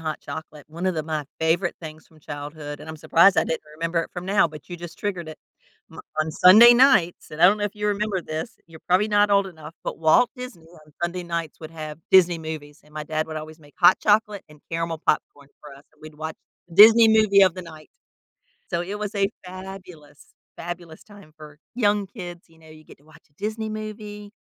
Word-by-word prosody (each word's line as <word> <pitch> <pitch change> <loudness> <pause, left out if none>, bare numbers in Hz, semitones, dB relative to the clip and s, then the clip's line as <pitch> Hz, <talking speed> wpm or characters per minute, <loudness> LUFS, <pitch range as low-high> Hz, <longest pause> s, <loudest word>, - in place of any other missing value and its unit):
hot 155 -2 -4
chocolate, 150 0 -9
one 170 +4 -5
of 185 - 0
the 155 - -2
my 155 -1 -4 0.2
favorite 170 +3 +1
things 155 -1 -10
from 160 - -23
childhood- 145 0 -8
and 150 - -11
I'm 160 - -7
surprised 170 +5 +4
I - - +3
didn't 160 - -3 0.2
remember 165 +1 -2
it - - -10
from 180 0 -7
now, 195 -2 +3
but 150 -2 -13
you 175 - -7
just 170 -1 -10
triggered 185 -6 -4
it- 155 - -10 0.5
m - - -10 0.2
on 155 - -1
Sunday 210 +9 +8
nights- 245 -9 +3
and 155 +3 -4
I - - +10
don't 205 +3 +3
know 205 - -1
if 205 - -4
you 210 - -2
remember 205 -2 -1
this, 155 0 -6
you're 165 -1 -15
probably 185 +4 +3
not 205 0 +3
old 200 -1 +3
enough- 160 -3 -11
but - - -5
Walt 160 +9 +4
Disney 250 -10 -9 0.2
on 150 - -22
Sunday 175 +1 -2
nights 170 -2 -4
would 155 0 -9
have 155 -1 -8
Disney 180 -2 +5
movies 155 -2 -8
and 150 - -22
my 155 - -4
dad 155 +1 -2
would 155 - -7
always 155 +1 -8
make 145 -2 -20
hot 180 +1 +6
chocolate 210 -1 +1
and 150 -1 -18
caramel 165 -1 -3
popcorn 145 -2 -1
for 145 -2 -12
us, 140 +1 -17
and - - -30
we'd 155 0 -11
watch 160 +1 -6 0.4
Disney 225 +5 +8
movie 215 -3 +5
of 185 -3 +4
the 185 - -7
night. 160 -2 -13 0.8
So, 170 - -1
it 200 +4 -6
was 210 0 -5
a 200 -1 +1 0.2
fabulous, 180 -5 -12 0.2
fabulous 170 -1 -8
time 200 -7 -17
for 150 -1 -14 0.2
young 205 -4 +1
kids, 180 -4 -10
you 165 - -24
know, 160 0 -18
you 155 0 -15
get - - -17
to 145 - -28
watch 155 +1 -20
a - - -37
Disney 220 +4 -4
movie 210 -1 -8
170 Hz, 225 wpm, -23 LUFS, 155-200 Hz, 0.8 s, I